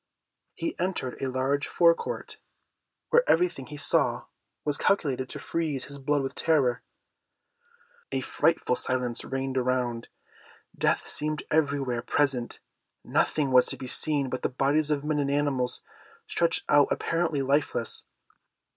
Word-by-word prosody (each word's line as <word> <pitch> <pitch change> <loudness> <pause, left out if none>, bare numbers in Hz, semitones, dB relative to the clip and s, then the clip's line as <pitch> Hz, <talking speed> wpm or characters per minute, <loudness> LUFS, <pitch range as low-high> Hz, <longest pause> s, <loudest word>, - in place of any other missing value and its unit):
He 330 - -3
entered 180 -8 -2
a 135 - -1
large 135 +2 0
fore 170 -1 +5
court, - - -6 0.7
where 480 - +6
everything 165 -6 +2
he 150 - -8
saw 145 - +1 0.4
was 145 -1 +1
calculated 135 -9 +1
to - - -6
freeze 155 -5 -2
his 140 0 -8
blood 145 +1 +1
with 135 - -4
terror. 140 -7 +1 1.3
A - - -1
frightful - - +1
silence 125 -2 -2
reigned 135 0 -2
around. 125 -2 -1 0.7
Death - - +1
seemed 155 0 -1
everywhere 140 -6 +1
present. 130 -2 0 0.5
Nothing 145 -3 +1
was 125 -1 +6
to - - -2
be - - -7
seen 140 +2 +1
but 130 0 -4
the - - 0
bodies 145 +4 +1
of 145 -2 0
men 150 0 0
and 140 -1 0
animals 140 -3 0 0.4
stretched 170 -1 +1
out 145 -1 +5
apparently 165 -4 0
lifeless. 135 -4 0
140 Hz, 140 wpm, -27 LUFS, 130-150 Hz, 1.3 s, where